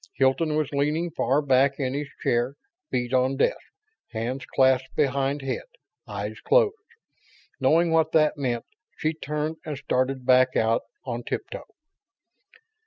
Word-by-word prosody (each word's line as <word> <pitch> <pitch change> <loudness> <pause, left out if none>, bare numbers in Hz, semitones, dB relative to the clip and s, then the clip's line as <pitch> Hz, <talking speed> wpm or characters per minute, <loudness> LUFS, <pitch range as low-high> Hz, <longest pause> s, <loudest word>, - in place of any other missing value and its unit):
Hilton 140 +4 +2
was 155 -2 0
leaning 150 +4 0
far 140 +2 +1
back 135 +1 +3
in 130 -2 -1
his 145 +1 -3 0.2
chair, 120 +3 +1 0.3
feet 125 0 -2
on 130 +1 +2
desk, - - +2 0.5
hands 120 +4 -4
clasped 130 0 +2
behind 140 0 0
head, 135 - -2 0.5
eyes - - -5
closed. 460 -3 +3 0.9
Knowing 170 +1 +3
what 160 -1 +3
that 155 -1 +3
meant, 125 -5 -2 0.3
she 155 +1 0
turned 150 +1 -3
and 150 -4 -5
started 130 0 -1
back 130 0 +4
out 115 +1 +2 0.2
on - - -3
tiptoe. - - -5
135 Hz, 135 wpm, -25 LUFS, 130-155 Hz, 0.9 s, back